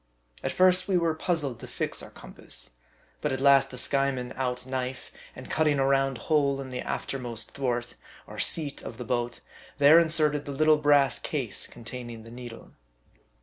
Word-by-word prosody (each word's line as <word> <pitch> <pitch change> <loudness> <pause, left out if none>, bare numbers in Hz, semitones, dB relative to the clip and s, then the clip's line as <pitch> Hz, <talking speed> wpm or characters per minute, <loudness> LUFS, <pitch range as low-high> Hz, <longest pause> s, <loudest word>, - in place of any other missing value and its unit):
At - - -1
first 185 0 +4
we 190 -2 +2
were 165 -2 +1
puzzled 155 -7 -2
to - - -9
fix - - -3
our - - -9
compass. - - -3 0.5
But - - -1
at 130 - -2
last 140 0 +5
the 125 - -9
Skyeman 135 -1 0
out 125 -1 -2
knife, 130 -1 -4 0.2
and - - -10
cutting 155 -2 +2
a 135 - +2
round 135 -1 +2
hole 140 -3 +2
in 135 -1 -6
the 125 - -4
after 135 - -3
most 120 -3 -5
thwart, 120 - -2 0.3
or - - -10
seat 150 -4 +1
of 115 - -8
the 125 - -6
boat, 120 0 -2 0.4
there 145 +3 +8
inserted 155 -3 +2
the 140 - -5
little 155 +2 +4
brass 145 -3 +4
case - - -1
containing 120 -1 -8
the 115 - -12
needle. 120 -1 -10
135 Hz, 180 wpm, -27 LUFS, 125-150 Hz, 0.5 s, there